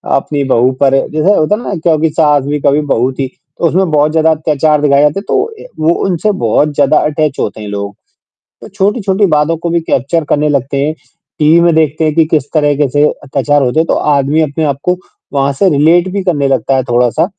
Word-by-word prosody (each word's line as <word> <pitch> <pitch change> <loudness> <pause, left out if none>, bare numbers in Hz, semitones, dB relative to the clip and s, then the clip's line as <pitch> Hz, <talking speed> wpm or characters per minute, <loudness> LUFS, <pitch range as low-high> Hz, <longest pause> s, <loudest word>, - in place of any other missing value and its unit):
अपनी 140 +1 -2
बहू 130 -1 +2
पर 135 -1 +3 0.2
जैसे 155 +7 +2
होता 155 +7 +1
है 230 - -7
ना 200 - -4
क्योंकि 160 -1 +1
सास 150 -3 +2
भी 145 +1 -2
कभी 145 +2 +2
बहू 125 +3 +1
थी 135 0 -3 0.3
तो - - -1
उसमें 185 +1 0
बहुत 150 0 +2
ज़्यादा 160 0 +2
अत्याचार 150 -1 0
दिखाया 140 -1 +3
जाते 150 +7 +1
तो - - +1
अ, 450 0 -12 0.2
वो 160 +2 +2
उनसे 185 +4 0
बहुत 145 +7 +1
ज़्यादा 145 +1 +2
अटैच 155 -2 -2
होते 105 +2 -3
हैं, 105 - -7
लोग 100 0 -5 0.7
तो - - -10
छोटी-छोटी 200 0 0
बातों 155 +2 +1
को 170 +1 -4
भी 170 0 +1
कैप्चर 160 +2 -1
करने 150 +1 +1
लगते 140 0 -1
हैं, 155 - -2 0.5
टीवी 155 +3 +4
में 170 -1 +3
देखते 155 0 +1
हैं 155 - 0
कि 165 - +4
किस 155 -4 +2
तरह 145 -2 +2
के 145 -1 +1
से 145 +3 +1 0.2
अत्याचार 145 +1 0
होते 125 +5 0
हैं 165 - 0
तो - - +1 0.2
आदमी 140 +3 +1
अपने 155 +1 -2
आप 140 -2 -1
को 180 0 +1 0.4
वहाँ 140 0 +1
से 190 +7 +2
रिलेट 165 +5 +3
भी 200 0 -2
करने 145 -7 0
लगता 135 0 0
है 130 - 0
थोड़ा-सा 120 +5 +1
150 Hz, 220 wpm, -12 LUFS, 140-165 Hz, 0.7 s, टीवी